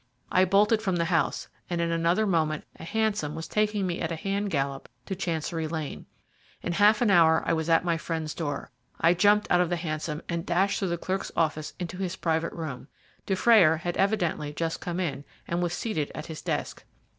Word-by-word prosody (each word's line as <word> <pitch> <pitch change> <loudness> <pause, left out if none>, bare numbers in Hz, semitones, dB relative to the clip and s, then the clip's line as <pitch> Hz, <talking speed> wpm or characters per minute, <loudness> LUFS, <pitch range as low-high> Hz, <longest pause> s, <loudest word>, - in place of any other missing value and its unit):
I 185 +1 +5
bolted 210 +4 +3
from 190 -4 0
the 170 -1 +1
house, 165 -4 0 0.2
and 175 -1 -1
in 170 0 0
another 170 +5 +2
moment 160 -5 +1
a - - -11
hansom 205 -6 -1
was 160 0 -5
taking 210 -2 0
me 175 -2 -2
at 165 - -2
a - - -1
hand 200 +5 -2
gallop 140 -4 -2 0.2
to 190 - -3
Chancery 165 -2 -2
Lane. 155 - -5 0.6
In 175 - -1
half 210 +4 +5
an 215 - +3
hour 160 -3 +5
I - - +2
was 160 0 -1
at 165 +2 +4
my 170 -1 +1
friend's 160 -2 -3
door. 145 -4 -4 0.3
I 165 +1 +5
jumped 205 +3 +4
out 180 - +5
of 175 - +1
the 175 - +1
hansom, 155 -2 -4
and 170 -1 -2
dashed 185 +4 +1
through 195 - -1
the 170 -1 -1
clerk's 190 +3 -3
office 155 -2 -1
into 180 0 -5
his 185 -1 -2
private 160 -2 -1
room. 145 -6 -6 0.4
Dufrayer 190 -4 +5
had 175 +2 -3
evidently 175 -7 0
just 165 +1 -2
come 175 -1 -3
in, 145 -6 -2 0.2
and 170 +1 -1
was 175 -1 0
seated 175 -6 -2
at 155 - -5
his 160 -1 -7
desk. - - -3
170 Hz, 205 wpm, -27 LUFS, 160-190 Hz, 0.6 s, I